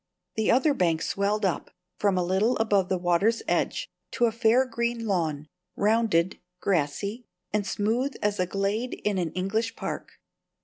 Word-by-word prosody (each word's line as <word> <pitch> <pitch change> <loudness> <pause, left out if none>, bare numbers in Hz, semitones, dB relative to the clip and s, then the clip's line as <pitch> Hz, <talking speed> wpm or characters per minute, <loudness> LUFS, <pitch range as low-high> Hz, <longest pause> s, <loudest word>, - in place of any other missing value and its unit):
The 220 -1 0
other 275 +5 +4
bank 170 -9 +1
swelled 200 +1 0
up, 185 - -1 0.3
from 200 -2 +2
a 180 - +2
little 190 +7 +2
above 205 -4 +2
the 185 - +1
water's 180 +6 +2
edge, - - 0 0.3
to 240 - +3
a 230 - +2
fair 230 +3 +3
green 235 -1 -2
lawn, 160 -7 -1 0.3
rounded, 205 -5 +2 0.2
grassy, 200 - -1 0.3
and 210 -2 0
smooth 235 +7 0
as 210 -1 0
a 180 - +1
glade 200 +6 -1
in 205 -2 +1
an 170 -3 -1
English 215 +5 -1
park. - - -5
205 Hz, 160 wpm, -27 LUFS, 185-230 Hz, 0.3 s, other